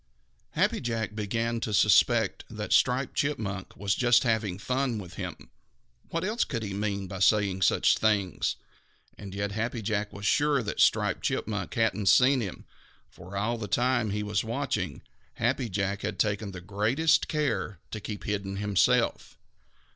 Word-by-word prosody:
Happy - - +1
Jack 115 -3 -2
began 115 +2 -1
to 110 - -3
suspect 105 -2 +4
that - - -3
Striped 125 +2 +2
Chipmunk 105 -10 -3
was 100 0 0
just 120 0 +4
having 110 -6 0
fun 125 +2 -1
with 95 -4 -8
him. - - -7 0.6
What 165 +1 -2
else 215 +5 +1
could 115 -4 -4
he 100 -2 -4
mean 100 -1 -2
by 95 +1 -6
saying 100 -1 +3
such - - +3
things? 100 -4 +1 0.6
And 100 -2 -9
yet 100 0 -2
Happy 115 +2 -3
Jack 105 0 -1
was 100 +1 -8
sure 145 +1 +2
that 105 - -4
Striped - - +3
Chipmunk 100 -5 -2
hadn't 105 -3 +1
seen 130 +3 +5
him, 100 -5 -6 0.5
for, 95 +3 -9
all 115 +4 -1
the 105 - -4
time 120 +1 +1
he 105 +1 -2
was 105 -1 -1
watching, - - -3 0.3
Happy 120 +1 0
Jack 100 +1 -2
had 105 -1 -3
taken 105 -1 0
the 90 -1 -8
greatest 110 - +2
care 140 - -1
to 110 - -4
keep 105 0 -6
hidden 100 -2 -3
himself. 100 -1 +1
105 Hz, 160 wpm, -28 LUFS, 100-120 Hz, 0.6 s, seen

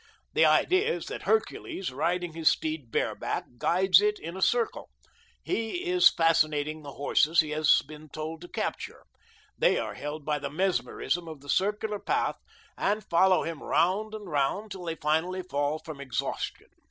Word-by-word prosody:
The - - +5
idea 380 +6 +3
is - - -6
that - - -5
Hercules, 335 - -1
riding 170 +4 -1
his 160 -1 +3
steed 155 -6 -2
bareback, - - -2
guides 185 +1 +4
it 210 0 +1
in 170 +3 -7
a 190 - -6
circle. 235 +3 +1 0.5
He 350 +5 -2
is 360 0 +6
fascinating 155 -2 +1
the 145 -2 -9
horses 155 +3 +3
he 155 -1 -6
has 155 0 +4
been 155 0 -11
told 155 +2 -6
to 175 - -9
capture. - - -4 0.6
They - - +4
are - - -3
held 150 0 -6
by 150 -1 0
the 140 - -4
mesmerism 175 0 -1
of 155 -4 -9
the 145 - -14
circular 210 +3 0
path - - 0 0.4
and 210 +1 0
follow 185 +2 +4
him 165 -2 -5
round 200 +6 +1
and 210 -2 -8
round 165 +8 -1
till 185 -2 -7
they 165 -1 -3
finally 165 +5 0
fall 145 -2 -1
from 155 -3 -9
exhaustion. 130 -5 -4
165 Hz, 165 wpm, -28 LUFS, 155-195 Hz, 0.6 s, is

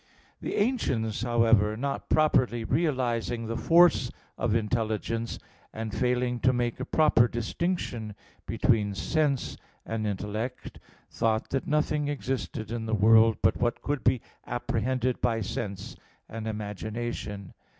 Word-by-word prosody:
The - - -3
ancients, 125 - 0
however, 115 -3 +3
not 140 +3 -3
properly 125 -6 +3
realizing 125 -5 0
the 115 +1 -3
force 165 -6 +5 0.3
of 110 -1 0
intelligence, 115 0 -1 0.3
and 110 -1 -5
failing 125 -1 0
to 130 - +4
make 120 -2 -1
a - - -3
proper 150 -7 +4
distinction 120 - -3 0.3
between 105 -3 +1
sense 145 +2 0 0.3
and 110 -1 -2
intellect, 105 +5 -4 0.3
thought 110 -1 0
that 135 - -1
nothing 150 -1 +1
existed 130 -6 -3
in 115 -1 -3
the 110 - +1
world 110 +2 +6
but - - +3
what 120 -1 -1
could 145 -1 -2
be 125 -2 +3 0.3
apprehended 125 +1 -1
by 115 -2 +1
sense 100 -1 -4 0.3
and 110 0 -6
imagination. 105 -1 -5
115 Hz, 125 wpm, -28 LUFS, 110-130 Hz, 0.3 s, world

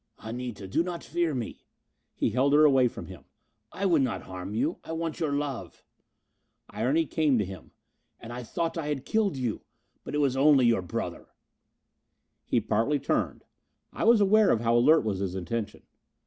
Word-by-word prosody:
"Anita, 115 -3 -6
do 95 - +1
not 175 -1 -4
fear 170 -2 -1
me." 120 -3 -5 0.5
He - - 0
held 130 +5 +2
her 150 +1 +7
away 135 -4 +5
from - - -7
him. 90 -7 -12 0.5
"I 200 - -3
would 170 -6 +4
not 130 -3 -1
harm 95 +2 -7
you. 145 +9 -1
I 165 - -6
want 165 -1 -3
your 155 -3 0
love." 135 - -4 0.9
Irony 130 +10 +1
came 150 -4 +1
to 105 - +1
him. 95 0 -10 0.5
"And 115 +1 -9
I 125 - -5
thought 165 +7 -3
I 150 - -4
had 145 -2 -3
killed 210 -8 0
you! 125 -4 -2 0.4
But - - -6
it - - +1
was 140 -3 +2
only 135 -1 +5
your 115 -4 +3
brother." 90 - -5 1.2
He 120 - +1
partly 115 +6 +1
turned. - - -2 0.5
I - - -3
was 230 0 +6
aware 210 +1 +5
of 115 - +2
how 115 0 +2
alert 150 +6 +5
was 100 -3 -1
his 95 -2 -3
attention. 105 +4 -4
130 Hz, 180 wpm, -27 LUFS, 115-160 Hz, 1.2 s, her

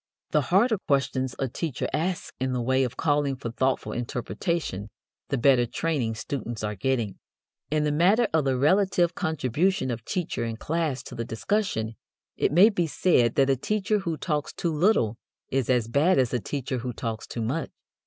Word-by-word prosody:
The 150 - +3
harder 200 - +3
questions 130 -2 0
a 135 - -1
teacher 135 +1 -3
asks 175 +3 -2
in 130 0 -1
the 125 - -1
way 130 +2 +2
of 125 - -3
calling 145 -3 +1
for 120 -3 -5
thoughtful 130 +2 0
interpretation 120 - -3 0.4
the 140 - 0
better 125 -1 +4
training 125 -5 -1
students 115 -2 -5
are 105 0 -1
getting. 115 -1 -1 0.5
In 150 0 +1
the 150 - +1
matter 195 +10 +4
of 160 -3 +2
the 130 -1 +1
relative 175 +3 +3
contribution 160 - 0
of 115 -2 -5
teacher 175 - -2
and 115 -1 -3
class 155 -3 -1
to - - -10
the 115 - -3
discussion, 115 - -1 0.4
it - - +1
may 180 +8 +7
be 180 -6 0
said 125 -8 +2
that 135 -1 +4
a - - +3
teacher 210 - 0
who 170 -5 -3
talks 150 -3 -2
too 170 -2 -2
little 150 - +2 0.3
is 130 -3 0
as 120 -3 +2
bad 145 +9 +3
as 130 -2 +2
a 125 - +1
teacher 130 +3 -3
who 125 +1 -4
talks 115 -2 -4
too 115 - -4
much. 140 +9 -2
135 Hz, 185 wpm, -26 LUFS, 120-170 Hz, 0.5 s, may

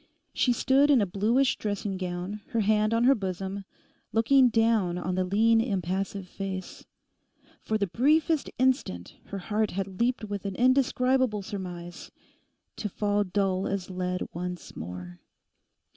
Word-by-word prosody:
She 250 - +2
stood 270 +4 +3
in 280 -4 +6
a 205 - +2
bluish 220 +8 +1
dressing 205 -1 -3
gown, 185 +2 -4
her 230 - +2
hand 215 +1 +2
on 230 +1 +2
her 265 +3 +6
bosom, 195 -2 -4 0.5
looking 250 +3 +5
down 225 -6 +2
on 180 +1 -2
the 185 +1 +1
lean 225 +5 +3
impassive 195 -2 -2
face. 190 0 -6 0.7
For 220 - -1
the 205 - +1
briefest 300 - +2
instant 250 - 0
her 200 - -6
heart 210 +3 -1
had 195 +2 -4
leapt 245 -1 +1
with 205 -2 -4
an 195 - -4
indescribable 255 -3 +2
surmise; 180 -4 -7 0.7
to 210 - -3
fall 205 +1 0
dull 190 0 0
as 195 -1 -3
lead 180 0 -2
once 180 0 -6
more. 90 +1 -8
205 Hz, 145 wpm, -27 LUFS, 185-230 Hz, 0.7 s, in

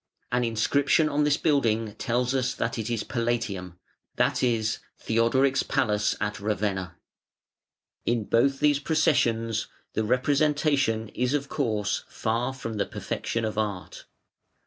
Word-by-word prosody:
An 125 0 +2
inscription 140 +7 +2
on 150 0 +1
this 145 -1 +3
building 115 -8 +1
tells 120 +3 -1
us 130 -1 0
that 115 0 -2
it 110 +1 -3
is 115 -2 -1
PALATIUM, 115 -7 -2 0.4
that - - +1
is 110 -3 +1 0.2
Theodoric's 130 +4 +2
palace 105 -1 +1
at 105 -1 -2
Ravenna. 100 -3 -2 1.1
In 115 -2 +1
both 135 +6 +2
these 150 -1 +3
processions 120 -8 +1 0.3
the 110 - 0
representation 135 -2 +1
is, 125 +4 0
of 140 -1 -2
course, 110 -7 -1
far 115 +3 -1
from 115 -4 -6
the 100 - 0
perfection 115 -1 -3
of 110 0 -2
Art. 100 -4 -4
115 Hz, 130 wpm, -26 LUFS, 110-135 Hz, 1.1 s, this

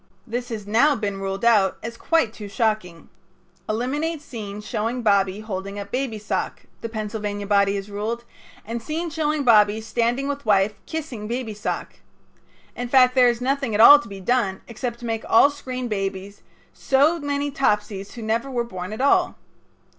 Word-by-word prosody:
This 245 +1 -4
has 215 -3 -5
now 240 +8 +4
been 205 -4 -3
ruled 195 +2 -3
out 210 -5 +4
as 230 +1 -5
quite 320 -5 +1
too 210 -3 -8
shocking. 205 -6 -2 0.6
"Eliminate 290 +9 -1
scene 210 -8 -7
showing 225 +3 -3
Bobby 200 -1 +2
holding 200 -1 -5
up 200 0 -7
baby's 245 -5 -3
sock," - - -3 0.2
the 230 - -4
Pennsylvania 210 -2 -4
body 200 0 +3
has 195 0 -4
ruled, 225 +4 -3 0.4
"and 230 +2 -4
scene 320 +6 -3
showing 305 -2 0
Bobby 215 -3 +5
standing 235 +4 -1
with 285 0 -3
wife 205 -1 +3
kissing 285 -10 -5
baby's 230 -3 -4
sock." - - -4 0.8
In 245 0 -4
fact, 255 -1 +5
there 250 -2 +6
is 235 0 -2
nothing 270 -3 0
at - - 0
all 290 +6 +10
to 290 - -10
be 195 -1 -8
done 195 -2 0
except 235 +1 -4
to - - -6
make 225 -1 -2
all 280 +5 +6
screen 255 -3 -5
babies 195 -1 -4 0.3
so 290 +5 +2
many 285 0 -2
Topsies 210 -7 -1
who 235 - -8
never 230 +5 -1
were 245 -3 -1
born 185 -3 -6
at 220 - -5
all. 280 - +3
225 Hz, 175 wpm, -23 LUFS, 205-255 Hz, 0.8 s, all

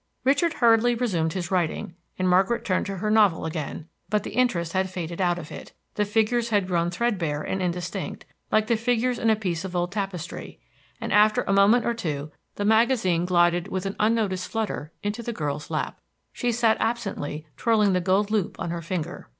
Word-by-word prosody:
Richard 285 +6 +3
hurriedly 235 -2 +4
resumed 180 -10 0
his 180 -2 -4
writing 175 -2 -1 0.2
and 185 - 0
Margaret 190 +6 +2
turned 185 - 0
to 195 -1 -4
her 210 +3 -1
novel 210 -7 +4
again; 155 -1 -5 0.2
but 210 0 +1
the - - -6
interest 175 -10 +1
had 190 0 +1
faded 175 -1 -5
out 175 -1 +2
of 160 -3 -8
it; - - -9 0.2
the 210 - 0
figures 225 +3 +1
had 205 -4 +2
grown 170 -2 0
threadbare 175 -7 -1
and 190 - -2
indistinct, 175 -1 -3 0.3
like 215 0 +3
the 230 0 +1
figures 245 +1 0
in 225 - +2
a 220 - +5
piece 180 -5 -3
of 185 -2 -6
old 175 +1 0
tapestry, 195 -5 -5 0.4
and - - -3
after 215 +1 +5
a 195 - 0
moment 200 +5 +5
or 235 - +1
two 150 -9 -4 0.2
the 205 - -2
magazine 220 -6 +3
glided 175 0 +3
with 190 -1 -3
an 195 - -3
unnoticed 210 -4 +1
flutter 215 -8 -3
into 205 +3 -2
the 235 0 -4
girl's 150 -5 -4
lap. - - -3 0.3
She 245 - -1
sat 225 -1 +3
absently 195 -10 -2
twirling 215 - +3
the 180 - +2
gold 195 +4 +1
loop 210 -5 -1
on 170 - -3
her 170 -1 -3
finger. 170 0 -5
195 Hz, 195 wpm, -25 LUFS, 175-225 Hz, 0.4 s, a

